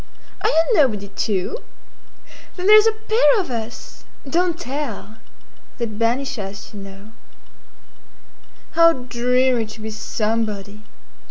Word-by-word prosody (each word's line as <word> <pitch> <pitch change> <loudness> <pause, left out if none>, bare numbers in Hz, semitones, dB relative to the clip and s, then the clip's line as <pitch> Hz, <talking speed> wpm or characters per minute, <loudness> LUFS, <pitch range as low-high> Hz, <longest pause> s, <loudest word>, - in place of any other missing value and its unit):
Are - - +2
you 325 - +4
nobody, 220 - +2
too? 205 - -2 1.0
Then 360 - -5
there 430 +1 +9
's 435 - +2
a - - +5
pair 445 +2 +3
of 360 -9 -3
us—don't 280 +8 -4
tell! 260 - -5 0.6
They 235 - -1
'd 215 -1 -8
banish 240 +2 0
us, 200 +1 -7
you 205 - -8
know. 195 +2 -11 1.6
How 335 0 +6
dreary 250 -1 +1
to 215 +1 -11
be 220 0 -6
somebody! 210 -1 -3
235 Hz, 120 wpm, -21 LUFS, 215-325 Hz, 1.6 s, there